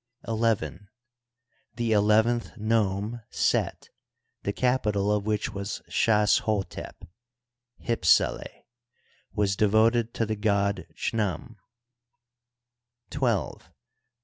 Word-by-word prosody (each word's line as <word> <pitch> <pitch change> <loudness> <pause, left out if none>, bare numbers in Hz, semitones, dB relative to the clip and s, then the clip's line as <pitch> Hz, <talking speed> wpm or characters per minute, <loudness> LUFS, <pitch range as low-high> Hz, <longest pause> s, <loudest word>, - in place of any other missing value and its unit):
XL 115 0 -2 1.3
The 120 -2 -1
eleventh 110 +3 +2
nome. 110 +1 0
Set, - - -1 0.5
the 100 - -2
capi 125 -2 +1
tal 100 0 0
of 105 0 0
which 105 -1 -1
was 100 +2 -5
Shas 105 -2 +3
hotep 105 -3 -4 0.8
(Hypsele), 105 -8 +1 0.7
was 100 -2 +1
devoted 110 +3 +2
to 115 - 0
the 110 0 -2
god 100 -1 0
Chnutn. 110 +1 -2 1.6
XII. 120 -8 -1
110 Hz, 90 wpm, -26 LUFS, 100-115 Hz, 1.6 s, Shas